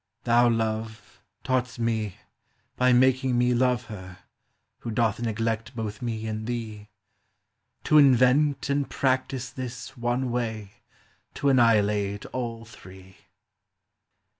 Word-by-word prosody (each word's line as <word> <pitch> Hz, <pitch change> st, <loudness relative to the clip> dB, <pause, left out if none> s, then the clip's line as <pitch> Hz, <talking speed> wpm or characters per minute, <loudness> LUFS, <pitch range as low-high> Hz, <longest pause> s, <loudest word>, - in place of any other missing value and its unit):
Thou, 120 Hz, 0 st, +4 dB
Love, 110 Hz, -1 st, -3 dB, 0.2 s
taught'st 125 Hz, -2 st, -1 dB
me, 110 Hz, -4 st, -1 dB, 0.6 s
by 125 Hz, 0 st, +3 dB
making 130 Hz, 0 st, +3 dB
me 125 Hz, 0 st, +3 dB
Love 125 Hz, 0 st, +1 dB
her, 95 Hz, -4 st, -10 dB, 0.6 s
who 120 Hz, -, -6 dB
doth 110 Hz, 0 st, 0 dB
neglect 115 Hz, +1 st, -2 dB
both 110 Hz, -2 st, -5 dB
me 115 Hz, -2 st, -3 dB
and 110 Hz, 0 st, -4 dB
thee, 110 Hz, -3 st, -5 dB, 0.9 s
To 155 Hz, -, +5 dB
invent 135 Hz, +1 st, +4 dB
and 140 Hz, 0 st, 0 dB
practise 130 Hz, -1 st, -1 dB
this 130 Hz, -2 st, -7 dB
one 120 Hz, +1 st, -1 dB
way 110 Hz, -4 st, -3 dB, 0.6 s
to 140 Hz, -, +1 dB
annihilate 105 Hz, -5 st, +2 dB
all 115 Hz, -2 st, -4 dB
three. 95 Hz, -3 st, -15 dB
120 Hz, 115 wpm, -26 LUFS, 110-125 Hz, 0.9 s, To